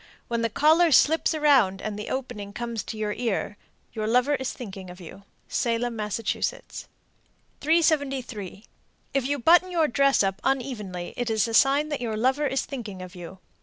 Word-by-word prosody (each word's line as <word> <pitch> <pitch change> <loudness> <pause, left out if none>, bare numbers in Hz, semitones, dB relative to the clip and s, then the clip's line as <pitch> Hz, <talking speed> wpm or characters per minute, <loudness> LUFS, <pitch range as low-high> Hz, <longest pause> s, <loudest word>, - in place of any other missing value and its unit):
When 235 -1 -1
the 230 - 0
collar 315 +8 +4
slips 320 +3 +4
around 265 -11 +3
and 215 -1 -4
the 210 +1 -6
opening 210 -6 -5
comes 235 -1 -4
to 220 - -6
the 215 +2 -3
ear, 215 -3 -1 0.4
your 215 -1 -3
lover 250 +5 +3
is 265 -2 -2
thinking 195 -6 -9
of 180 +1 -11
you. 190 +3 -12 0.2
Salem, 235 0 -1
Mass. 210 -2 -3
373. 275 - -3 0.5
If 270 -2 0
you 285 +1 0
button 345 +8 +5
your 335 -3 +2
dress 275 -2 +3
up 195 0 -2
unevenly, 215 -10 -3
it 245 -1 -2
is 220 0 +1
a 230 - -5
sign 280 +6 +4
that 290 -4 -3
your 225 -3 -2
lover 265 +6 +1
is 270 0 -1
thinking 210 -9 -7
of 180 0 -10
you. 180 0 -10
240 Hz, 170 wpm, -25 LUFS, 210-280 Hz, 0.5 s, button